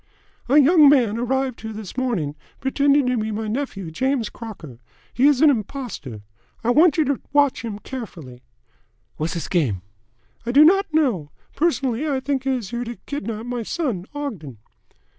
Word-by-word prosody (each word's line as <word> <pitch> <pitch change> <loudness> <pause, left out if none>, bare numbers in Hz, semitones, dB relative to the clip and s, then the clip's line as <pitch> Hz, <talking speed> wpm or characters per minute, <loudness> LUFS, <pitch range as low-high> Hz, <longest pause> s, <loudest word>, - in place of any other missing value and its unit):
"A 280 - +5
young 300 0 +7
man 235 -6 +3
arrived 260 +1 -1
here 220 0 -6
this 210 -3 -8
morning, 230 - -1 0.3
pretending 280 +1 +2
to 250 0 +1
be 220 0 -1
my 220 +1 -3
nephew, 210 - -4
James 260 - -1
Crocker. 170 - -10 0.3
He 265 +3 +4
is 285 -3 +3
an 310 -2 +7
impostor. 210 - -5 0.4
I 235 - +2
want 315 +5 +5
you 315 - +3
to 280 -1 -1
watch 285 -2 +3
him 225 -2 -4
very 205 - -9
carefully." 165 - -8 0.8
"Whassiz 160 0 -2
game?" 120 - 0 0.6
"I 235 - -2
do 295 +3 +8
not 390 +2 +4
know. 250 - +1 0.3
Personally 290 -3 0
I 270 -2 0
think 265 0 -2
he - - +1
is 245 -6 -2
here 240 0 -2
to 235 0 -6
kidnap 225 -5 -4
my 245 -1 -3
son 225 - -3
Ogden." 190 - -5
245 Hz, 170 wpm, -22 LUFS, 210-280 Hz, 0.8 s, do